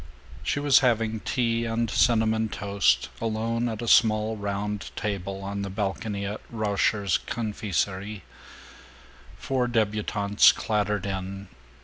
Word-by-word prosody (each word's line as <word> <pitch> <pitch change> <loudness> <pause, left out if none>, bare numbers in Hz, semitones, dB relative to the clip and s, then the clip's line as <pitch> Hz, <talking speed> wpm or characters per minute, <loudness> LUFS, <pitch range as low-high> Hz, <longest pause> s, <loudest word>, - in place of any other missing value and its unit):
She - - -1
was 145 -2 +5
having 115 -3 +1
tea 115 0 0
and 115 0 0
cinnamon 110 -1 +2
toast, 100 -13 +1
alone 115 +1 -1
at 110 +1 -5
a - - -4
small 110 -1 +4
round 100 0 -3
table 100 -2 -4
on 100 +1 -4
the 100 - -4
balcony 100 +1 -3
of 105 +2 -5
Rauscher's 100 -5 +1
Confiserie. 100 -2 -3 1.1
Four 130 -2 -1
debutantes 105 -3 +3
clattered 105 -2 -1
in. 95 0 -5
105 Hz, 115 wpm, -26 LUFS, 100-115 Hz, 1.1 s, was